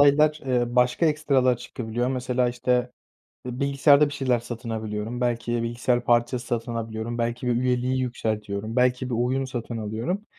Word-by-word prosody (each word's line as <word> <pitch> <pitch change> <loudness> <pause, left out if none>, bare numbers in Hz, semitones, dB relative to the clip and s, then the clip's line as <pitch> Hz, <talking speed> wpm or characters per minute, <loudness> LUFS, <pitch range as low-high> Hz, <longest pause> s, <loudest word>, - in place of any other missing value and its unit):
aylar, 150 +2 +5
eee, 120 -1 0
başka 125 +6 +3
ekstralar 140 -5 +2
çıkabiliyor, 120 0 -3
mesela, 125 -1 0
işte, 125 0 0 0.6
eee, 125 0 -5
bilgisayarda 140 +1 +5
bir 145 - -6
şeyler 130 -4 +1
satın 120 0 -7
alabiliyorum, 110 +2 -4
belki 120 -1 0
bilgisayar 120 +1 0
parçası 120 +1 +1
satın 120 -1 -2
alabiliyorum, 115 +1 -4
belki 120 +1 -2
bir 120 - +2
üyeliği 125 +1 +1
yükseltiyorum, 110 -3 -3
belki 125 0 +2
bir 120 - -1
oyun 130 +3 0
satın 120 -2 -5
alıyorum. 115 - -3
125 Hz, 155 wpm, -25 LUFS, 115-130 Hz, 0.6 s, aylar